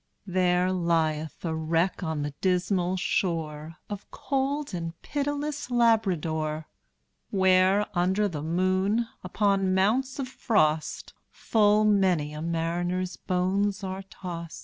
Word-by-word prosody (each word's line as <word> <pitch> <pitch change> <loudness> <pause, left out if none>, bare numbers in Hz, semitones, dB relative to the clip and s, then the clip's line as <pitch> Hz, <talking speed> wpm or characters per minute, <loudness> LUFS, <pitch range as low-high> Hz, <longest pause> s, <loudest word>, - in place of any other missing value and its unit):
There 180 -1 +2
lieth 165 -3 0
a 165 - -1
wreck 165 +4 0
on 160 -4 -2
the 145 -1 -4
dismal 180 0 +1
shore 160 -4 -2
Of 205 -1 -7
cold 280 0 -2
and 165 -1 -5
pitiless 290 0 -3
Labrador; 170 -10 +1 0.6
Where, 190 +1 +4
under 190 +4 +2
the 155 -6 -5
moon, 185 +7 +1 0.2
upon 195 0 +1
mounts 245 +8 +1
of 270 -2 -3
frost, 155 -12 0 0.2
Full 210 -1 +3
many 185 -8 +2
a 150 - -6
mariner's 175 +2 -1
bones 195 +2 0
are 190 0 -4
tost. 175 -3 -7
185 Hz, 115 wpm, -27 LUFS, 165-205 Hz, 0.6 s, Where